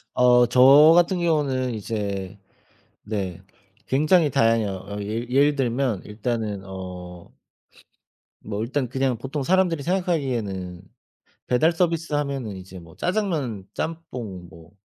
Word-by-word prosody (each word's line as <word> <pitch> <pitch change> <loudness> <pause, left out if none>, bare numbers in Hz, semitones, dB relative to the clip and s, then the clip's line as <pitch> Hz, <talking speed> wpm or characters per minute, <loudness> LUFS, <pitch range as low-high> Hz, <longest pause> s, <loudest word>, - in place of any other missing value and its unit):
어 125 -1 +5
저 135 +6 +7
같은 175 +1 +3
경우는 140 -7 0
이제 100 -2 -4 0.7
네. 95 -4 -4 0.4
굉장히 155 +4 +3
다양해요. 115 -3 +2 0.2
어 100 0 -6
예 110 +4 -3
예를 145 +3 +3
들면 125 -5 -1
일단은 105 -2 -3
어 90 -2 -9 1.1
뭐 105 -1 -4
일단 130 +1 -2
그냥 130 -1 -1
보통 135 +3 -4
사람들이 175 -4 +2
생각하기에는 120 - -2 0.7
배달 155 +7 +3
서비스하면은 150 - -1
이제 95 0 -10
뭐 85 -1 -15
짜장면 160 - -2
짬뽕 120 - -6
뭐 85 0 -16
125 Hz, 245 characters per minute, -23 LUFS, 100-150 Hz, 1.1 s, 저